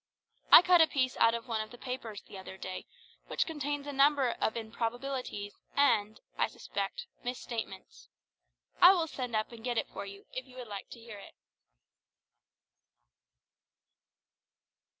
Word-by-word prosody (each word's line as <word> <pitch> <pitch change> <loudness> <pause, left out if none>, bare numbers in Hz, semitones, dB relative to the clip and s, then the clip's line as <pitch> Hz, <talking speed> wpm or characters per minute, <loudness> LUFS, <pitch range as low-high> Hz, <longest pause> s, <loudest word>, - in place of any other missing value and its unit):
I - - +12
cut 360 -2 +6
a 320 - +7
piece 260 -4 0
out 230 0 +5
of 235 - -6
one 225 -2 -1
of 215 - -6
the 245 - -12
papers 235 -5 -6
the - - -13
other 190 0 -9
day 185 -1 -6 0.4
which - - 0
contains 290 -2 -3
a 290 - -5
number 275 -2 +4
of 220 - -1
improbabilities 230 -1 -4 0.2
and, 220 -7 +3 0.2
I - - +4
suspect, 485 -1 -4 0.2
misstatements. 235 -5 -6 0.7
I 360 +2 +10
will 345 -4 +1
send 250 -6 -4
up 215 +2 0
and 230 -1 -11
get 245 -1 -1
it - - 0
for 200 - -7
you, 200 0 -11
if 255 +1 -5
you 255 0 -15
would 250 -2 -7
like 200 -2 -7
to 235 - -10
hear 225 -3 -10
it. - - -13
240 Hz, 155 wpm, -31 LUFS, 220-275 Hz, 0.7 s, I